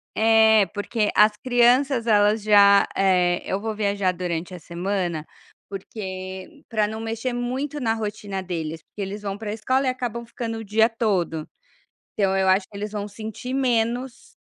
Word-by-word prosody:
É 220 -2 +5
porque 210 +1 -1
as 210 0 +5
crianças 245 +1 +3
elas 210 -1 +3
já, 200 -1 +6
eh, 180 -2 +2
eu 190 - -2
vou 220 +1 -4
viajar 200 -2 0
durante 175 0 -4
a 180 - -7
semana, 175 -1 -3 0.4
porque 190 - -7
para 215 -2 +1
não 220 +1 -6
mexer 225 +3 -3
muito 260 +5 -3
na 225 -4 0
rotina 205 -3 -4
deles, 165 -3 -5
porque 210 - -10
eles 200 +2 -5
vão 200 -1 -3
para 215 -2 -4
escola 255 +5 0
e - - +4
acabam 245 -2 -3
ficando 230 -1 -5
o - - -6
dia 220 +2 +3
todo. 195 -9 -1 0.7
Então 195 -2 +1
eu 190 0 +2
acho 190 +1 +3
que 205 - -15
eles 210 +1 -4
vão 205 -1 -4
sentir 220 +4 -7
menos, 245 -1 -1
210 Hz, 165 wpm, -23 LUFS, 195-230 Hz, 0.7 s, já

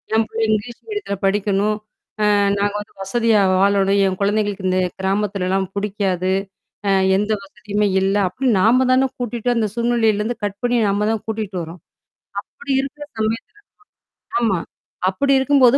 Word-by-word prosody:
என் 225 - +3
புள்ள 225 - -4
இங்கிலீஷ் 220 +2 -1
மீடியத்துல 415 - -3
படிக்கணும். 205 +1 +1 0.6
அ - - +4 0.2
நாங்க 200 0 0
வந்து 210 - -10
வசதியா 225 +2 +2
வாழணும், 195 +1 +3
என் 185 - -1
கொழந்தைகளுக்கு 205 -1 0
இந்த 185 - +1 0.2
கிராமத்துலலாம் 195 -1 0
பிடிக்காது. 195 -3 -1 0.6
அ - - +3 0.3
எந்த 210 +2 0
வசதியுமே 210 +1 -2
இல்ல. 195 +1 +1
அப்பிடின்னு 245 +2 +1
நாம 250 +5 +4
தானே 260 +1 +4
கூட்டிட்டு 240 0 -2
அந்த 225 -2 +1
சூழ்நிலையிலருந்து 235 -1 +1
கட் 200 -1 -2
பண்ணி 245 0 +1
நம்ம 205 +1 +1
தான் 220 - -2
கூட்டிட்டு 215 -3 -4
வர்றோம் 165 +1 -9 0.7
அப்பிடி 280 - -5
இருக்கிற 290 +2 -7 0.2
சமயத்துல 220 +1 -2 0.9
ஆமா. 210 -7 +1 0.5
அப்பிடி 275 +9 +1
இருக்கும்போது 265 -1 +5
210 Hz, 140 wpm, -20 LUFS, 195-235 Hz, 0.9 s, இருக்கும்போது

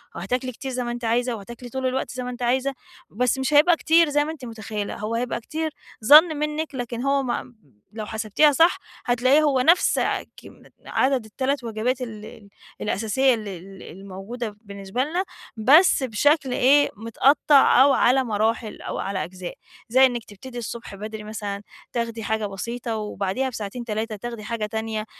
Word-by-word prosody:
وهتاكلي 250 +8 -2
كتير 265 +2 -7
زي 250 0 -2
ما 240 - -3
أنتِ 240 0 -5
عايزة 240 +1 +1
وهتاكلي 235 +4 -10
طول 260 +2 -4
الوقت 255 +1 -1
زي 255 0 -5
ما 250 - -4
أنتِ 250 0 -8
عايزة، 260 +3 +1 0.4
بس 250 +3 0
مش 265 +3 -1
هيبقى 320 +4 +6
كتير 325 -1 +4
زي 290 0 +2
ما 310 - -3
أنتِ 290 -6 -9
متخيلة، 215 -3 -5
هو 215 +2 -3
هيبقى 240 +1 -2
كتير 315 +6 -3 0.3
ظن 305 +4 +8
منك، 300 0 -3
لكن 245 -1 -4
هو 275 +1 +1
مم 245 0 -4 0.4
لو 215 -1 -4
حسبتيها 220 +8 +2
صح 325 +5 +4 0.3
هتلاقيه 255 +5 +3
هو 275 -4 +2
نفس، 335 +7 +4
آآ - - 0
كمي - - -15 0.2
عدد 260 -3 +1
ال3 260 +5 -2
وجبات 235 +3 -2
ال 220 -4 -6
ال 210 -2 -13 0.3
الأساسية 230 +6 +2
ال 215 -2 -4
ال 190 +1 -9
الموجودة 200 +5 -7
بالنسبة 200 +3 -4
لنا، 345 +6 -1 0.3
بس 280 - +5
بشكل 270 +4 +2
إيه، 285 +4 +4
مِتقطَّع 270 +4 +4
أو 280 - +5
على 260 +1 +3
مراحل 220 0 -1
أو - - -5
على 195 -4 -2
أجزاء، 180 +1 -7 0.4
زي 260 +3 +6
إنك 240 -3 -1
تبتدي 245 +5 -11
الصبح 230 -2 -6
بدري 215 +1 -7
مثلًا 205 -2 -5 0.3
تاخدي 230 -2 -3
حاجة 220 0 -1
بسيطة، 230 +4 -4
وبعديها 210 +4 -2
بساعتين، 230 +1 -6
3 220 0 -3
تاخدي 235 +1 -7
حاجة 225 0 -3
تانية، 220 0 -3
240 Hz, 175 wpm, -23 LUFS, 215-265 Hz, 0.4 s, ظن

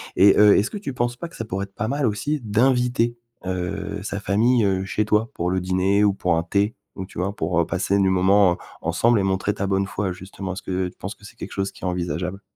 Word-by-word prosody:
et 100 +1 +6
heu, 105 -1 +7
est-ce 105 - +1
que - - -4
tu 195 -9 -5
penses 120 -1 -1
pas 170 - -5
que 165 - -15
ça 115 - -5
pourrait 95 -2 -3
être 100 - -23
pas 110 - -2
mal 140 +2 0
aussi 145 +8 -1
d'inviter, 120 +1 +2 0.3
heu, 90 -1 -3
sa 100 - -4
famille, 115 +4 +2
heu, 95 -1 0
chez 105 +2 -1
toi 110 +2 +1
pour 90 +1 -1
le 95 - +1
dîner 95 +3 +2
ou 100 -1 +4
pour 90 -3 0
un 85 - 0
thé? 100 +5 0 0.2
Donc 95 -1 -5
tu 95 - -9
vois, 95 +3 -1
pour, 85 -3 -2
heu, - - 0
passer 95 +3 0
du 95 -1 +3
moment, 95 0 +4
heu, - - -5 0.3
ensemble 115 -1 +2
et - - +1
montrer 95 +1 0
ta 100 -1 -3
bonne 95 0 +1
foi. 100 -1 -2
Justement, 95 +1 -6
est-ce 95 - -7
que 95 0 -1
tu - - -20
penses 100 +2 -6
que - - -25
c'est 115 +3 -13
quelque - - -7
chose 95 0 -2
qui - - -17
est 95 - 0
envisageable? 90 +1 -3
100 Hz, 265 wpm, -23 LUFS, 95-110 Hz, 0.3 s, heu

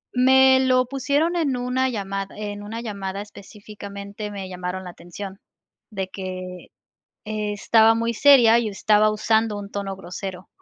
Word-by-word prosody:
Me 260 +1 +6
lo 255 -1 +3
pusieron, 285 +6 0
en 285 -7 0
una 255 +1 0
llamada 195 -3 -4
en 205 -1 -5
una 225 +3 -6
llamada 200 -3 -5
específicamente, 205 0 -9
me 195 -2 -6
llamaron 180 0 -5
la 180 - -8
atención, 190 +3 -9 0.5
de 195 -3 -4
que 185 -1 -7 0.6
estaba 215 +1 +2
muy 230 +1 -1
seria, 235 -2 +6
y 225 - -2
estaba 210 +1 +3
usando 220 0 +1
un 200 0 -8
tono 195 -1 -4
grosero, 185 0 -7
210 Hz, 140 wpm, -23 LUFS, 195-235 Hz, 0.6 s, Me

